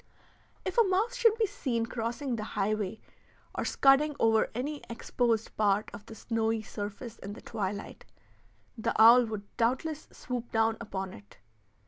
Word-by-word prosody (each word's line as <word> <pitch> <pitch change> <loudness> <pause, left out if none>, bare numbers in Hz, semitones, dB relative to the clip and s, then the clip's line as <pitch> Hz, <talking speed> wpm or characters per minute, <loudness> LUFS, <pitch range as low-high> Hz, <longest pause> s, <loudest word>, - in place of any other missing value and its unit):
If - - 0
a - - +8
mouse 410 +5 +1
should 460 -3 +4
be 450 - +3
seen 250 - -2
crossing 235 +3 -3
the 215 - -4
highway, 210 +1 -1 0.5
or - - -2
scudding 280 +2 +4
over 225 -1 +3
any 285 +5 -3
exposed 230 -1 -1
part 205 0 +2
of 205 +1 -10
the 225 - -9
snowy 225 0 -1
surface 210 +3 -7
in 200 +1 -7
the - - -11
twilight, 205 -2 -4 0.7
the 220 - -2
owl 235 +2 +8
would 215 -2 -5
doubtless 265 +6 0
swoop 245 -2 -5
down 225 0 +2
upon 190 -4 -5
it. 100 0 -15
230 Hz, 150 wpm, -30 LUFS, 215-265 Hz, 0.7 s, a